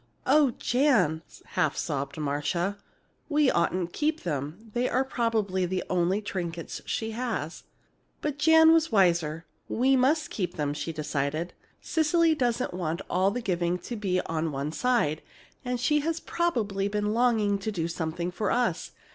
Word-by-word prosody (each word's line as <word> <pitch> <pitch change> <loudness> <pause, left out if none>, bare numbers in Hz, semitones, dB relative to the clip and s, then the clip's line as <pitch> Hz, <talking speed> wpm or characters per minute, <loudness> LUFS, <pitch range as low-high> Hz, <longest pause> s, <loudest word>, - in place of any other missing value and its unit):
"Oh, 280 -2 +4
Jan!" 245 - +2 0.2
half - - 0
sobbed 140 -2 -3
Marcia; 155 +7 -1 0.5
"we 295 -3 +3
oughtn't 170 0 0
to - - -8
keep 310 +1 +1
them! 165 +7 -5
They're 250 +1 +1
probably 220 -8 0
the 185 +1 -2
only 185 +3 +1
trinkets 170 -4 -5
she 225 0 -2
has." 225 -9 -4 0.5
But 295 -1 -3
Janet 320 +1 +7
was 330 -2 +3
wiser. 170 -5 +2 0.2
"We 260 +3 +3
must 285 +5 +2
keep 180 -4 -3
them," 145 -1 -1
she 150 +3 -4
decided. 155 +2 -2 0.3
"Cecily 325 0 +2
doesn't 245 - 0
want 170 -1 -3
all 185 +2 +3
the 245 +5 -3
giving 175 -4 0
to 240 - -7
be 190 -4 0
on 160 0 -2
one 140 +2 -3
side, 195 -9 +1 0.4
and 250 -1 -2
she 300 +5 +2
has 325 +2 -1
probably 215 -16 -1
been 210 +1 -1
longing 220 -4 +2
to 215 +3 -3
do 170 -5 -2
something 170 +1 -3
for 205 +3 -2
us. 230 -8 0
200 Hz, 155 wpm, -27 LUFS, 170-250 Hz, 0.5 s, Janet